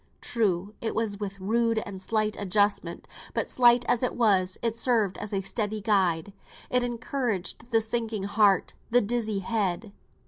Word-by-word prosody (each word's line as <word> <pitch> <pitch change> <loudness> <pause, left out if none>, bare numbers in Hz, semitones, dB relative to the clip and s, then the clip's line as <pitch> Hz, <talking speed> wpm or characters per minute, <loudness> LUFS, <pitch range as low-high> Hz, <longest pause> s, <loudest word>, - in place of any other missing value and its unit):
True, 205 -4 -1
it 225 - -2
was 215 -2 -1
with 195 -1 -5
rude 230 +3 +1
and 190 -2 -7
slight 215 +1 0
adjustment: 200 -3 0 0.3
but, - - 0
slight 240 -1 +4
as 245 - +2
it 250 - -1
was, 190 -6 +2
it 230 -1 +1
served 230 -5 +1
as 210 - -5
a 195 -2 0
steadying 210 +1 -2
guide; 195 -4 +1 0.4
it 250 - +3
encouraged 240 -3 -2
the 225 -2 +3
sinking 220 -2 -2
heart, 200 -1 +2 0.2
the 245 +1 +4
dizzy 220 -2 -1
head. 200 -1 -2
215 Hz, 160 wpm, -27 LUFS, 195-230 Hz, 0.4 s, slight